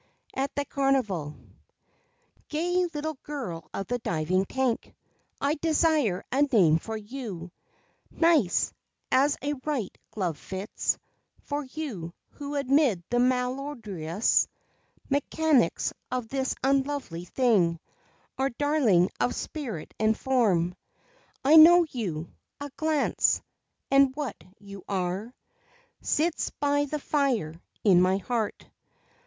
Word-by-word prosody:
AT 270 Hz, +1 st, -1 dB
THE 285 Hz, -, -1 dB
CARNIVAL 230 Hz, -, 0 dB, 1.1 s
Gay 355 Hz, +3 st, +1 dB
little 305 Hz, -2 st, -4 dB
Girl 225 Hz, -, -6 dB
of 195 Hz, -, -4 dB
the 245 Hz, +5 st, -2 dB
Diving 180 Hz, -1 st, 0 dB
Tank, 260 Hz, +1 st, -1 dB, 0.4 s
I 285 Hz, +1 st, +1 dB
desire 310 Hz, -, +2 dB
a 270 Hz, -, +2 dB
name 195 Hz, -, +4 dB
for 220 Hz, +5 st, -5 dB
you, 205 Hz, -6 st, -7 dB, 0.6 s
Nice, 315 Hz, -, +2 dB, 0.4 s
as 280 Hz, +3 st, +3 dB
a 290 Hz, +1 st, 0 dB
right 275 Hz, -10 st, -2 dB
glove 180 Hz, -7 st, -3 dB
fits; 190 Hz, +2 st, -2 dB, 0.5 s
For 290 Hz, 0 st, -3 dB
you 255 Hz, -, -6 dB
who 290 Hz, 0 st, -7 dB
amid 275 Hz, -, +2 dB
the 245 Hz, -, +2 dB
malodorous 250 Hz, -, 0 dB, 0.6 s
Mechanics 290 Hz, 0 st, +1 dB, 0.2 s
of 250 Hz, -3 st, -3 dB
this 265 Hz, 0 st, -1 dB
unlovely 270 Hz, -10 st, 0 dB
thing, 185 Hz, -8 st, +2 dB, 0.6 s
Are 270 Hz, +1 st, +2 dB
darling 240 Hz, -, +2 dB
of 245 Hz, -, +1 dB
spirit 240 Hz, -, -5 dB
and 220 Hz, 0 st, +2 dB
form. 205 Hz, -10 st, +2 dB, 0.7 s
I 305 Hz, +4 st, +7 dB
know 345 Hz, +2 st, +9 dB
you 170 Hz, -10 st, -4 dB, 0.3 s
a 285 Hz, 0 st, -6 dB
glance, 310 Hz, -2 st, +2 dB, 0.5 s
and 275 Hz, -1 st, +5 dB
what 285 Hz, -, -5 dB
you 200 Hz, -2 st, -11 dB
are 190 Hz, +3 st, -2 dB, 0.7 s
Sits 320 Hz, +1 st, 0 dB
by 285 Hz, 0 st, +2 dB
the 300 Hz, +2 st, -3 dB
fire 270 Hz, -, 0 dB, 0.3 s
in 185 Hz, -4 st, +6 dB
my 185 Hz, +1 st, +3 dB
heart. 220 Hz, +1 st, -3 dB
255 Hz, 115 wpm, -27 LUFS, 190-290 Hz, 1.1 s, know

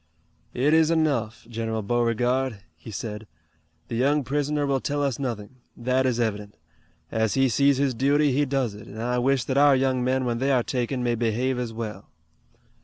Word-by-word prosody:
"It 140 Hz, +5 st, +2 dB
is 160 Hz, 0 st, +5 dB
enough, 140 Hz, -10 st, 0 dB
General 115 Hz, -1 st, -3 dB
Beauregard," 120 Hz, 0 st, 0 dB
he 95 Hz, -, -12 dB
said. 105 Hz, +1 st, -6 dB, 0.6 s
"The -, -, -7 dB
young 140 Hz, +4 st, +2 dB
prisoner 145 Hz, +2 st, -1 dB
will 135 Hz, -1 st, +1 dB
tell 145 Hz, +2 st, -2 dB
us 140 Hz, -2 st, -1 dB
nothing. 120 Hz, -3 st, -5 dB, 0.2 s
That 130 Hz, +2 st, +1 dB
is 120 Hz, -2 st, 0 dB
evident. 105 Hz, -5 st, -2 dB, 0.5 s
As 110 Hz, -2 st, 0 dB
he 135 Hz, 0 st, +4 dB
sees 140 Hz, +3 st, +3 dB
his 135 Hz, -1 st, +1 dB
duty 140 Hz, +4 st, +2 dB
he 145 Hz, +3 st, +2 dB
does 130 Hz, -5 st, -1 dB
it, 105 Hz, 0 st, -11 dB
and 110 Hz, -, -9 dB
I 125 Hz, +2 st, 0 dB
wish 130 Hz, 0 st, +2 dB
that 135 Hz, +2 st, 0 dB
our 145 Hz, -1 st, +6 dB
young 130 Hz, -1 st, +1 dB
men 130 Hz, +1 st, +1 dB
when 120 Hz, -1 st, -1 dB
they 135 Hz, +2 st, +1 dB
are 125 Hz, -3 st, +3 dB
taken 125 Hz, +1 st, -2 dB
may 120 Hz, -1 st, +1 dB
behave 120 Hz, +3 st, 0 dB
as 120 Hz, -2 st, -3 dB
well. 110 Hz, -1 st, -6 dB
125 Hz, 185 wpm, -25 LUFS, 115-135 Hz, 0.6 s, our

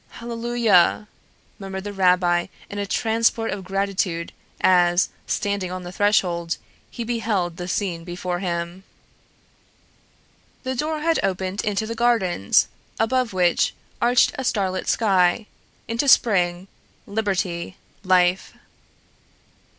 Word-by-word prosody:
"HALLELUIA!" 230 Hz, -4 st, +2 dB, 0.5 s
murmured 190 Hz, -1 st, -6 dB
the 205 Hz, 0 st, -5 dB
rabbi 180 Hz, -2 st, +3 dB, 0.2 s
in 205 Hz, -, -5 dB
a 200 Hz, -, -2 dB
transport 225 Hz, +1 st, +1 dB
of 195 Hz, 0 st, -5 dB
gratitude 190 Hz, -3 st, -2 dB, 0.3 s
as, 175 Hz, -1 st, +4 dB, 0.2 s
standing 200 Hz, -3 st, -1 dB
on 185 Hz, 0 st, -5 dB
the 175 Hz, -, -7 dB
threshold, 180 Hz, -4 st, +1 dB, 0.3 s
he 235 Hz, -, -5 dB
beheld 220 Hz, -7 st, -1 dB
the 175 Hz, -, -5 dB
scene 180 Hz, -3 st, -2 dB
before 175 Hz, 0 st, -4 dB
him. 175 Hz, 0 st, -4 dB, 1.8 s
The 260 Hz, -1 st, -2 dB
door 305 Hz, +4 st, -2 dB
had 330 Hz, +1 st, +2 dB
opened 190 Hz, +1 st, -2 dB
into 210 Hz, +1 st, -1 dB
the 230 Hz, -, -4 dB
gardens, 225 Hz, -, +2 dB, 0.3 s
above 250 Hz, +1 st, +1 dB
which 180 Hz, -2 st, +2 dB, 0.3 s
arched 245 Hz, +1 st, +4 dB
a -, -, -2 dB
starlit 195 Hz, -6 st, -1 dB
sky, 195 Hz, -1 st, +2 dB, 0.4 s
into 230 Hz, +5 st, -1 dB
spring, 180 Hz, -7 st, +3 dB, 0.4 s
liberty, 190 Hz, -4 st, -2 dB, 0.3 s
life! 185 Hz, 0 st, +2 dB
195 Hz, 110 wpm, -23 LUFS, 180-225 Hz, 1.8 s, as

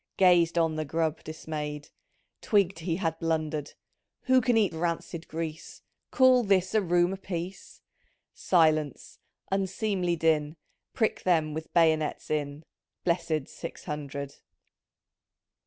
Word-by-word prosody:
Gazed 175 Hz, -3 st, +4 dB
on 165 Hz, -2 st, +2 dB
the 155 Hz, -, -1 dB
grub 160 Hz, +1 st, -2 dB
disraay'd 150 Hz, -2 st, -6 dB, 0.3 s
— -, -, -47 dB
Twigged 195 Hz, -5 st, +2 dB
he 165 Hz, 0 st, -2 dB
had 165 Hz, -3 st, -2 dB
blundered; 155 Hz, -2 st, -2 dB, 0.2 s
— -, -, -50 dB
" -, -, -60 dB
Who 260 Hz, -1 st, +4 dB
can 245 Hz, -2 st, +2 dB
eat 205 Hz, -6 st, +2 dB
rancid 170 Hz, 0 st, -3 dB
grease? 160 Hz, -1 st, -6 dB, 0.3 s
Call 255 Hz, -1 st, +5 dB
this 190 Hz, -4 st, +2 dB
a 215 Hz, -, +4 dB
room 175 Hz, 0 st, +2 dB
a -, -, -5 dB
piece! 185 Hz, -1 st, -7 dB, 0.2 s
" -, -, -41 dB
* -, -, -49 dB
" -, -, -63 dB
Silence! 155 Hz, -5 st, +1 dB, 0.3 s
unseemly 190 Hz, -2 st, 0 dB
din, 155 Hz, -2 st, +1 dB, 0.4 s
Prick 220 Hz, -, 0 dB
them 160 Hz, -4 st, +1 dB
with 160 Hz, +1 st, -6 dB
bayonets 160 Hz, -3 st, +2 dB
in." 145 Hz, 0 st, -2 dB, 0.4 s
Blessid 170 Hz, -4 st, 0 dB
Six 165 Hz, -, -8 dB
Hundred 140 Hz, -3 st, -6 dB
165 Hz, 140 wpm, -28 LUFS, 155-185 Hz, 0.4 s, Call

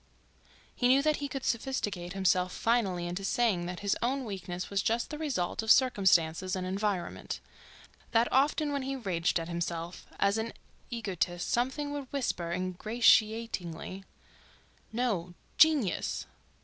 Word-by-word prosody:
He 245 Hz, -, +1 dB
knew 265 Hz, +2 st, +5 dB
that 305 Hz, 0 st, +2 dB
he 285 Hz, -, -3 dB
could 270 Hz, -1 st, -5 dB
sophisticate 205 Hz, -8 st, -2 dB
himself 185 Hz, -1 st, +2 dB
finally 200 Hz, -7 st, +1 dB
into 175 Hz, +3 st, -4 dB
saying 195 Hz, -4 st, +1 dB
that 180 Hz, 0 st, -5 dB
his 200 Hz, -1 st, +1 dB
own 260 Hz, +2 st, 0 dB
weakness 185 Hz, -3 st, -5 dB
was 200 Hz, 0 st, +1 dB
just 230 Hz, +7 st, 0 dB
the 300 Hz, -, -4 dB
result 265 Hz, -, -1 dB
of 220 Hz, -, -5 dB
circumstances 185 Hz, -8 st, +4 dB
and 185 Hz, -1 st, -3 dB
environment; 195 Hz, -1 st, -2 dB, 0.7 s
that 230 Hz, +1 st, +3 dB
often 290 Hz, +3 st, +2 dB
when 280 Hz, -1 st, -1 dB
he 270 Hz, +1 st, -3 dB
raged 180 Hz, -9 st, 0 dB
at 165 Hz, -, -5 dB
himself 170 Hz, 0 st, -4 dB
as 200 Hz, +2 st, +3 dB
an 225 Hz, +1 st, -3 dB, 0.4 s
egotist 185 Hz, -6 st, -2 dB
something 265 Hz, +4 st, 0 dB
would 285 Hz, -3 st, -5 dB
whisper 215 Hz, -11 st, -2 dB
ingratiatingly: 195 Hz, -1 st, +1 dB, 0.9 s
"No. 205 Hz, -8 st, -1 dB, 0.2 s
Genius!" 300 Hz, -, +3 dB
205 Hz, 135 wpm, -30 LUFS, 180-250 Hz, 0.9 s, knew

